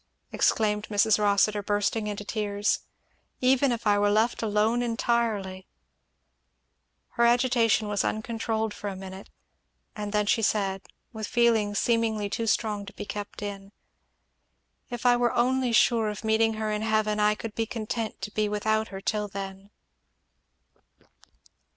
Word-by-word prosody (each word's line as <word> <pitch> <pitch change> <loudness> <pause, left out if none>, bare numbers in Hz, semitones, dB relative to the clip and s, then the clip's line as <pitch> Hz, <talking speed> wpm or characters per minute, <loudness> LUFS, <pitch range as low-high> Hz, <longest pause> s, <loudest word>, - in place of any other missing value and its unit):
exclaimed 210 -1 +1
Mrs. 210 0 +3
Rossitur 205 0 +2
bursting 205 +1 -1
into 205 0 -5
tears, 205 -1 -1 0.6
"even 260 +1 +3
if 235 -1 -3
I 205 -1 +3
were 205 0 +3
left 220 +3 +1
alone 220 +2 +1
entirely 225 -5 -1 0.7
" - - -49
Her 235 - +4
agitation 240 -3 +3
was 205 -1 0
uncontrolled 220 -1 -2
for 205 - -7
a 195 - -4
minute, 190 +1 -9 0.7
and 210 -1 -5
then 210 0 +1
she 225 +2 +2
said, 195 -3 0 0.3
with 220 -2 -5
feeling 225 -4 +2
seemingly 220 -2 0
too 230 0 -2
strong 210 -2 0
to 195 - -9
be - - -7
kept 205 0 -6
in, 200 0 -7 1.2
"If 240 0 -6
I 245 0 +5
were 240 -1 +1
only 255 +1 +2
sure 225 -1 +3
of 210 +1 -6
meeting 220 0 +2
her 215 0 -2
in 210 0 -2
heaven, 215 -1 +1
I 210 0 +3
could 220 0 -7
be 225 0 -2
content 225 0 -4
to 210 - -5
be 210 0 0
without 220 +1 0
her 195 -2 -8
till 210 +1 -1
then! 195 0 -7
215 Hz, 150 wpm, -27 LUFS, 205-225 Hz, 1.2 s, I